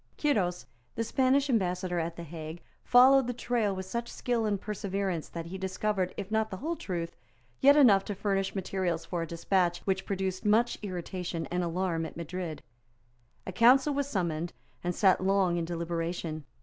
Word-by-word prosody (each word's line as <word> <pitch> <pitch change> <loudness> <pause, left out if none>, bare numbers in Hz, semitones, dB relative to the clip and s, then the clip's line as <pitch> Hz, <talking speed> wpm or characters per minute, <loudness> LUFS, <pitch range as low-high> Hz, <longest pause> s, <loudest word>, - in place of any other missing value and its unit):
Quiros, 185 -12 +1 0.3
the 230 - 0
Spanish 265 +4 +2
Ambassador 180 -6 0
at 165 0 -3
the 170 - -7
Hague, 160 +1 -8 0.2
followed 260 +1 +6
the 245 - -2
trail 230 -5 0
with 190 0 -5
such 235 +5 -4
skill 235 -3 -1
and 205 -2 0
perseverance 195 -4 -3
that 165 -1 -6
he 185 +3 -7
discovered, 190 0 -1
if 200 +1 -5
not 220 0 +1
the 190 - -5
whole 325 - -2
truth, 170 - -4 0.4
yet 285 +2 +6
enough 210 -9 +6
to 205 - -4
furnish 195 0 -1
materials 190 -2 -2
for 175 -2 -3
a 165 - -3
despatch 175 +1 +1
which 190 -1 -1
produced 190 -1 -2
much 220 +3 +3
irritation 180 -3 -4
and 180 0 0
alarm 170 -1 -1
at - - -12
Madrid. 170 -1 -5 0.8
A - - -4
council 255 +9 +5
was 280 0 -1
summoned, 170 - -2 0.3
and 175 0 -1
sate 190 -3 +4
long 190 -2 +2
in 170 - -1
deliberation. 165 -2 -3
190 Hz, 175 wpm, -29 LUFS, 175-215 Hz, 0.8 s, followed